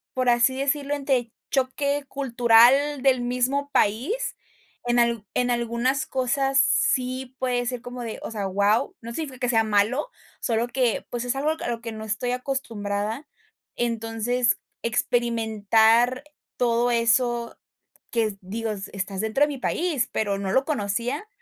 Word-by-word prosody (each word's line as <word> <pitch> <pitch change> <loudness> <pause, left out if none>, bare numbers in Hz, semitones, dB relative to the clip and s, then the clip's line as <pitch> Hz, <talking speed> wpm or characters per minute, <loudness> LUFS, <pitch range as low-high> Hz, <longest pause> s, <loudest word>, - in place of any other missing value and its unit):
por 255 -1 +2
así 240 +2 +4
decirlo, 280 +1 0
entre 265 -5 0 0.2
choque 280 +2 0
cultural 260 +2 +4
del 260 -2 +4
mismo 250 +4 0
país. 280 - 0 0.5
En 240 0 +1
al 235 -3 +1
en 250 0 +1
algunas 240 +3 0
cosas 270 +1 0
sí 255 -1 +1
puede 245 -1 0
ser 250 -1 -3
como 245 0 -7
de 225 -2 -5
o - - -5
sea, 210 -3 -3
¡guau!, 200 +3 +1
no 235 0 -7
significa 280 -2 -5
que 250 - 0
sea 225 -2 +3
malo, 215 - +1 0.3
solo 230 0 0
que, 245 -2 0
pues, 240 0 -3
es 245 +1 -1
algo 290 +3 +1
a - - -3
lo 230 -1 -3
que 235 -1 -5
no 220 0 -7
estoy 220 +3 -2
acostumbrada. 230 -2 -3 0.5
Entonces, 230 +1 0 0.3
experimentar 230 +1 +2 0.3
todo 240 0 +2
eso 235 0 +1 0.5
que, 220 -4 0
digo: 220 +4 -4 0.2
"Estás 195 -1 -4
dentro 220 +6 +2
de - - +4
mi 285 - -4
país, 310 -4 0
pero 205 -2 0
no 195 -1 -2
lo 265 +5 +3
conocía", 245 - -2
240 Hz, 150 wpm, -25 LUFS, 225-265 Hz, 0.5 s, así